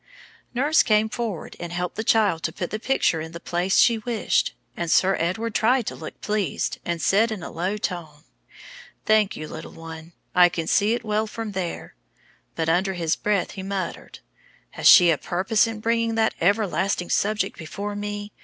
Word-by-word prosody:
Nurse 290 Hz, +5 st, +4 dB
came 215 Hz, -1 st, +2 dB
forward 220 Hz, -7 st, -4 dB
and 175 Hz, 0 st, -6 dB
helped 175 Hz, 0 st, -3 dB
the 220 Hz, -, -3 dB
child 210 Hz, -7 st, +2 dB
to -, -, -2 dB
put 175 Hz, -, -5 dB
the 215 Hz, -, -3 dB
picture 230 Hz, -9 st, +1 dB
in 160 Hz, +1 st, -8 dB
the 170 Hz, -, -7 dB
place 175 Hz, +3 st, 0 dB
she 230 Hz, -1 st, +5 dB
wished; 225 Hz, 0 st, 0 dB, 0.2 s
and 170 Hz, -1 st, -3 dB
Sir 190 Hz, +4 st, +4 dB
Edward 200 Hz, +7 st, -1 dB
tried 240 Hz, +2 st, +2 dB
to -, -, -4 dB
look -, -, -9 dB
pleased, 210 Hz, -3 st, -2 dB
and 170 Hz, -1 st, -2 dB
said 220 Hz, +7 st, +3 dB
in 205 Hz, -6 st, -5 dB
a -, -, -7 dB
low 185 Hz, +5 st, -2 dB
tone, 165 Hz, -7 st, -5 dB, 0.8 s
"Thank 215 Hz, -2 st, +3 dB
you, 155 Hz, -, -6 dB
little -, -, -9 dB
one, 165 Hz, 0 st, -10 dB, 0.2 s
I 180 Hz, 0 st, +6 dB
can 165 Hz, -1 st, -4 dB
see 210 Hz, +7 st, +2 dB
it 240 Hz, -, -6 dB
well 215 Hz, +1 st, 0 dB
from 225 Hz, 0 st, -5 dB
there"; 185 Hz, -3 st, -5 dB, 0.6 s
but 160 Hz, -1 st, -1 dB
under 185 Hz, +4 st, +1 dB
his 170 Hz, -3 st, 0 dB
breath 205 Hz, -3 st, 0 dB
he 195 Hz, -, -7 dB
muttered, 195 Hz, 0 st, -5 dB, 0.5 s
"Has -, -, 0 dB
she 175 Hz, -2 st, +8 dB
a 155 Hz, -, 0 dB
purpose 195 Hz, +6 st, +1 dB
in 225 Hz, -1 st, -6 dB
bringing 230 Hz, 0 st, 0 dB
that 220 Hz, -1 st, +2 dB
everlasting 195 Hz, -1 st, +1 dB
subject 215 Hz, +1 st, 0 dB
before 200 Hz, +6 st, -5 dB
me? 205 Hz, 0 st, -5 dB
200 Hz, 185 wpm, -24 LUFS, 175-220 Hz, 0.8 s, she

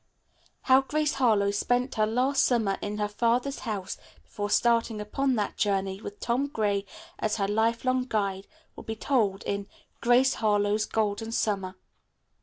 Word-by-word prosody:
How 260 Hz, +1 st, +5 dB
Grace 300 Hz, +2 st, 0 dB
Harlowe 215 Hz, -7 st, +3 dB
spent 245 Hz, +5 st, 0 dB
her 215 Hz, -1 st, +1 dB
last 255 Hz, +5 st, +2 dB
summer 220 Hz, -6 st, +1 dB
in 205 Hz, 0 st, -4 dB
her 210 Hz, 0 st, 0 dB
father's 240 Hz, +6 st, 0 dB
house 205 Hz, -5 st, -4 dB, 0.2 s
before 205 Hz, -2 st, -5 dB
starting 230 Hz, -1 st, +2 dB
upon 260 Hz, +5 st, 0 dB
that 210 Hz, -3 st, -2 dB
journey, 195 Hz, -1 st, 0 dB
with 205 Hz, -, -8 dB
Tom 245 Hz, +4 st, 0 dB
Gray 205 Hz, -6 st, -1 dB, 0.3 s
as 215 Hz, -, 0 dB
her 195 Hz, -2 st, 0 dB
life 225 Hz, +4 st, 0 dB
long 255 Hz, 0 st, +1 dB
guide, 200 Hz, -4 st, -2 dB, 0.3 s
will -, -, -10 dB
be 220 Hz, -, -5 dB
told 215 Hz, -6 st, 0 dB
in 200 Hz, 0 st, -3 dB, 0.3 s
"Grace 250 Hz, +2 st, +4 dB
Harlowe's 210 Hz, -1 st, +1 dB
Golden 220 Hz, +1 st, -1 dB
Summer." 195 Hz, -4 st, -1 dB
220 Hz, 155 wpm, -27 LUFS, 205-245 Hz, 0.3 s, How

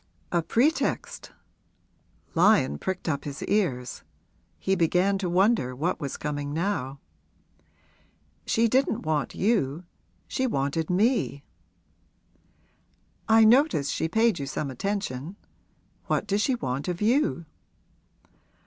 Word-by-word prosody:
'A 175 Hz, -, +2 dB
pretext?' 245 Hz, -, 0 dB, 1.0 s
Lyon 165 Hz, -, +3 dB
pricked 190 Hz, -1 st, -4 dB
up 140 Hz, -3 st, -1 dB
his 145 Hz, -1 st, -6 dB
ears 145 Hz, -, -1 dB, 0.6 s
he 190 Hz, -, -1 dB
began 185 Hz, +2 st, +2 dB
to 185 Hz, -2 st, -2 dB
wonder 180 Hz, -, +2 dB
what 160 Hz, +8 st, -1 dB
was 140 Hz, -4 st, -4 dB
coming 145 Hz, -1 st, -4 dB
now. 160 Hz, -7 st, -2 dB, 1.5 s
'She 230 Hz, +1 st, +3 dB
didn't 250 Hz, -1 st, +1 dB
want 155 Hz, -3 st, -1 dB
you 180 Hz, -, 0 dB, 0.4 s
she 260 Hz, -, -1 dB
wanted 145 Hz, -, -1 dB
me.' 190 Hz, -, +1 dB, 1.9 s
'I 225 Hz, 0 st, +7 dB
noticed 240 Hz, -, +4 dB
she -, -, -1 dB
paid 225 Hz, -2 st, +2 dB
you 140 Hz, -, -4 dB
some 140 Hz, 0 st, -3 dB
attention. 180 Hz, 0 st, -3 dB, 0.7 s
What -, -, 0 dB
does 205 Hz, 0 st, 0 dB
she 260 Hz, +3 st, +1 dB
want 135 Hz, -, -3 dB
of 180 Hz, -1 st, -2 dB
you?' 230 Hz, -, +1 dB
180 Hz, 115 wpm, -26 LUFS, 145-215 Hz, 1.9 s, I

